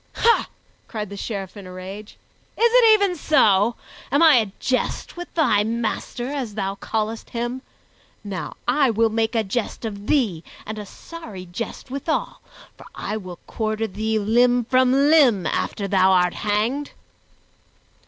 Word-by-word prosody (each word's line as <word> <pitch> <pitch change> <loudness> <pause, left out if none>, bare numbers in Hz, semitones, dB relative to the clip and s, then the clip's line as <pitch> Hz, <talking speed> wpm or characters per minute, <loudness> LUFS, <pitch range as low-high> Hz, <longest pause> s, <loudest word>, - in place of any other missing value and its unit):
"Ha!" 465 0 +3 0.4
cried 210 -3 -5
the - - -6
Sheriff 195 -2 -5
in 200 -3 -10
a - - -9
rage, 190 +3 -9 0.4
"is 470 +1 +4
it 470 -3 +7
even 400 -4 +1
so? 225 - +3 0.4
Am 285 +4 +4
I 315 -5 +8
a 215 -4 +1
jest 255 -1 -2
with 350 0 -8
thy 240 -11 +3
master, 230 +2 -3
as 260 -7 -4
thou 195 -2 -2
callest 220 +2 -3
him? 240 +2 -3 0.6
Now 200 -3 -5
I 265 +2 +3
will 225 0 +2
make 225 +1 0
a 225 - +2
jest 220 +3 -3
of 205 -1 -6
thee 215 - +1 0.2
and 215 0 -5
a 205 - -7
sorry 215 - -10
jest 230 +8 -7
withal, 280 +4 -2 0.3
for - - -14
I 210 - -4
will 185 -5 -7
quarter 220 0 -2
thee 220 +2 -2
limb 240 +3 +3
from 255 +1 +3
limb, 275 - +4
after 200 - -2
thou 190 -1 +4
art 180 -1 +3
hanged." 225 +8 -1
225 Hz, 155 wpm, -22 LUFS, 205-260 Hz, 0.6 s, I